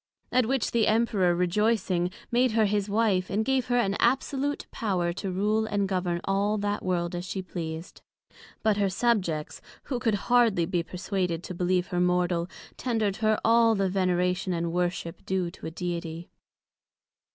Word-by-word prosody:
At 250 -2 +3
which 265 -1 0
the 230 -2 +2
Emperor 210 -6 +2
rejoycing, 180 -1 +1 0.2
made 245 0 +3
her 220 -1 +4
his 205 0 0
Wife, 200 -4 +1
and 215 +2 0
gave 265 -1 +1
her 245 0 +2
an 200 -5 +1
absolute 270 +3 0
power 180 -6 -1
to 195 +1 -4
rule 210 +4 +1
and 205 -2 0
govern 180 -2 -1
all 200 +2 +1
that 205 0 -2
World 175 -2 -1
as 175 0 -3
she 185 +1 -4
pleased. 165 -2 -6 0.6
But 215 -2 +3
her 200 -1 +2
subjects, 185 -7 0 0.2
who 255 -3 -3
could 225 -4 +1
hardly 235 -8 +4
be 175 0 0
perswaded 180 -1 -3
to 185 - -6
believe 180 0 0
her 180 -1 0
mortal, 180 -1 +1 0.3
tender'd 220 -5 -1
her 215 -1 +2
all 230 0 +5
the 195 -1 +1
Veneration 180 0 0
and 170 -1 -2
Worship 175 -1 -2
due 185 -2 -1
to 180 - -9
a - - -3
Deity. 170 0 -5
195 Hz, 165 wpm, -27 LUFS, 175-220 Hz, 0.6 s, all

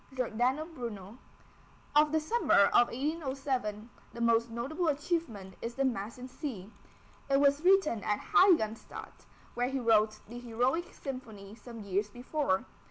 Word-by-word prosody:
GIORDANO 255 +4 0
BRUNO. 230 -4 -7 0.8
Of 300 0 +5
the 315 - +2
summer 310 - +3
of 240 - +6
1807, 265 -6 -3 0.3
the 235 - -9
most 230 0 +3
notable 275 +10 -2
achievement 285 - -2
is 235 +1 -5
the 275 - +1
Mass 230 -3 -2
in 250 +1 -8
C. 240 - -7 0.6
It 275 0 +4
was 285 +1 +4
written 360 - +4
at 210 -1 +1 0.2
Heiligenstadt, 325 - +2 0.3
where 245 +1 0
he 270 0 -2
wrote 220 -3 +3
the 240 +3 -8
Heroic 245 +8 -1
Symphony 225 -8 -8
some 230 +1 -10
years 200 +1 -1
before. 245 -2 -1
245 Hz, 140 wpm, -31 LUFS, 220-285 Hz, 0.8 s, of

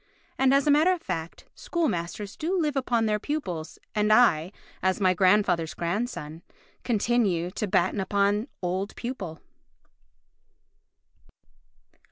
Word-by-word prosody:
And 265 0 +4
as 275 0 +3
a 295 - +4
matter 310 +5 +5
of 360 -2 -1
fact, 165 0 -5
school 340 -2 -1
masters 180 +2 -4
do 360 +4 -1
live 300 -4 0
upon 240 -4 +1
their 210 -1 +1
pupils, 190 - -4 0.2
and 210 0 +1
I, 185 -8 +4 0.3
as 190 +2 +1
my 185 -2 +3
grandfather's 185 -3 +2
grandson, 170 -4 -3 0.4
continue 210 -7 +1
to 210 +2 -3
batten 185 +2 +1
upon 200 +3 +1 0.2
old 185 +3 -2
pupil. 200 -10 -6
205 Hz, 125 wpm, -26 LUFS, 180-245 Hz, 0.4 s, matter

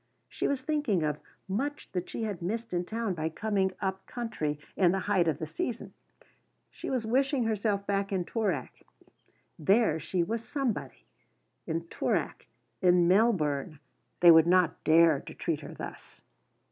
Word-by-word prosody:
She - - -2
was 275 -2 -1
thinking 290 - 0
of 150 -1 -1 0.3
much 275 +10 -3
that 180 -1 -3
she 230 - -4
had 205 -5 -3
missed 225 +4 -3
in 175 0 0
town 225 0 -2
by 160 -2 -2
coming 195 +2 0
up 190 -1 -2
country 190 -12 -3 0.2
in 180 -3 +4
the 190 +1 -1
height 185 -4 +2
of 155 -4 +1
the 160 - -4
season; 190 +9 -4 0.8
she - - -7
was 255 -4 -1
wishing 265 +3 +1
herself 210 -2 0
back 200 0 -1
in 185 -3 0
Toorak. 220 -1 -2 0.8
There 190 0 +3
she 175 +2 -1
was 225 +6 -3
somebody; 265 -4 -3 0.6
in 165 0 -1
Toorak, - - -2 0.3
in 180 -2 +5
Melbourne, 165 - +2 0.4
they 175 -1 +9
would 160 0 +7
not 180 -2 +3
dare 160 -2 +5
to - - -11
treat 165 -4 -2
her 145 - -9
thus. - - -10
190 Hz, 160 wpm, -29 LUFS, 170-225 Hz, 0.8 s, they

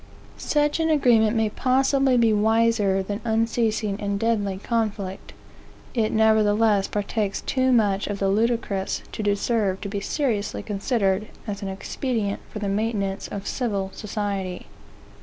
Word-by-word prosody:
Such 295 +1 +1
an 325 0 +1
agreement 235 -7 +4
may 220 -1 +2
possibly 270 +1 +2
be 230 -2 +4
wiser 215 -2 +2
than 205 +3 -4
unceasing 225 -2 0
and 200 -1 -1
deadly 205 -4 0
conflict; 205 -3 -3 0.6
it 220 -3 +1
nevertheless 220 -2 +3
partakes 205 -1 -2
too 260 -1 +1
much 205 -5 +2
of 205 - -3
the 195 - 0
ludicrous 215 -2 0
to - - -5
deserve 205 -1 0
to 200 - -4
be 200 0 -3
seriously 220 -3 -2
considered 205 -1 0 0.2
as 205 -3 -5
an 200 - -4
expedient 205 +2 -2
for - - -8
the 205 -1 -3
maintenance 200 -1 -1
of 200 -1 -6
civil 200 -6 -2
society. 200 -3 -4
215 Hz, 140 wpm, -24 LUFS, 200-230 Hz, 0.6 s, agreement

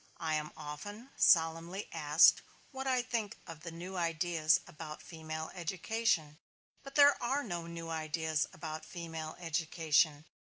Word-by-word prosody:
I 160 -2 -2
am 155 0 -1
often 205 - -8
solemnly 165 +3 +3
asked 155 0 +6 0.3
what 265 -1 -5
I 255 -2 +2
think 230 -5 -2
of 165 -3 -9
the 170 - -6
new 175 +3 -7
ideas 165 -1 +2
about 155 -1 -8
female 160 -1 -6
education. 175 -3 -1 0.4
But 275 0 -11
there 285 -1 +6
are 270 +4 0
no 175 -7 -4
new 165 -1 -6
ideas 160 -1 -1
about 155 -1 -6
female 165 -2 -6
education. 160 -2 +1
165 Hz, 135 wpm, -33 LUFS, 155-190 Hz, 0.4 s, asked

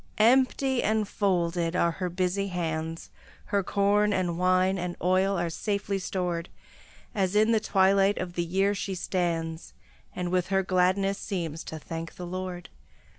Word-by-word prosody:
Empty 260 +3 +3
and 215 -1 +1
folded 175 -4 0
are 170 -1 +3
her 180 +2 -3
busy 185 +2 -1
hands; 165 -2 -3 0.3
Her 200 - +1
corn 205 +2 +2
and 180 -3 0
wine 185 +2 +2
and 175 0 -3
oil 185 +2 +2
are 170 -1 -1
safely 200 +1 -2
stored, 180 -2 -2 0.6
As 190 -1 0
in 215 +2 +4
the 225 - +4
twilight 195 -1 +3
of 180 -1 -4
the 175 - -1
year 195 +4 +1
she 195 -1 -3
stands, 170 -3 -2 0.4
And 180 -1 -3
with 180 -1 +1
her 195 0 +1
gladness 185 +2 +1
seems 165 -4 -4
to 160 - -6
thank 165 +1 -7
the 180 - -7
Lord. 180 0 -5
185 Hz, 155 wpm, -27 LUFS, 175-200 Hz, 0.6 s, in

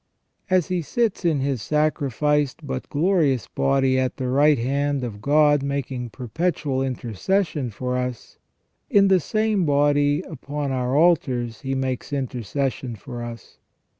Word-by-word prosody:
As 185 -3 +2
He 180 -1 0
sits 220 - -1
in 155 -5 +2
His 135 -4 -1
sacrificed 150 0 0
but 130 -2 -5
glorious 150 - +2
body 135 -1 +1
at 130 -1 -1
the 130 -1 -2
right 145 +3 +4
hand 140 +3 0
of 105 -4 -6
God 145 +1 +4
"making 135 -3 -3
perpetual 135 - -2
intercession 135 - -1
for 125 +3 -3
us," 125 -2 -5 0.5
in 200 -1 +5
the 190 -1 +5
same 215 +2 0
body 145 +1 +2
upon 145 -3 -5
our 130 +1 0
altars 130 -9 +2
He 135 -1 -2
makes 130 +1 -3
intercession 130 -1 -3
for 120 +3 -8
us. 115 -3 -9
140 Hz, 135 wpm, -23 LUFS, 125-150 Hz, 0.5 s, in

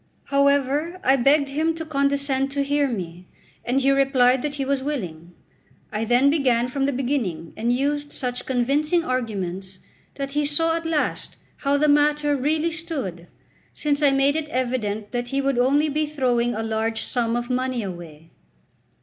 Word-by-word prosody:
However, 280 +5 +2
I 265 - +5
begged 280 +2 +3
him 315 +3 0
to 325 0 -5
condescend 280 -2 0
to 280 0 0
hear 285 0 +1
me, 180 -6 -6 0.4
and 260 +3 +1
he 275 +1 +3
replied 265 -2 +3
that 290 +1 -3
he 275 -2 -2
was 275 0 0
willing. 180 - -5 0.6
I 215 +1 -2
then 245 +5 +4
began 250 -5 +2
from 270 +1 -1
the - - +1
beginning, 240 - -2
and 235 +2 0
used 290 +3 -1
such 250 -2 -4
convincing 285 +7 +1
arguments 195 - -3 0.4
that 275 -1 -4
he 295 +1 0
saw 325 +3 +2
at 330 0 -3
last 315 -2 -1 0.2
how 280 0 +1
the 300 +1 +2
matter 295 0 +3
really 305 +5 0
stood, 280 - -5 0.5
since 295 -1 0
I 290 - +5
made 275 +1 +2
it 315 -1 -2
evident 235 -6 -2
that 245 0 -2
he 270 +3 -1
would 275 -2 0
only 280 +5 +3
be 305 +1 -1
throwing 245 -5 0
a 225 - -2
large 225 0 -1
sum 235 -2 -1
of 240 +1 -3
money 255 -2 -1
away. 165 -4 -9
270 Hz, 170 wpm, -23 LUFS, 240-290 Hz, 0.6 s, I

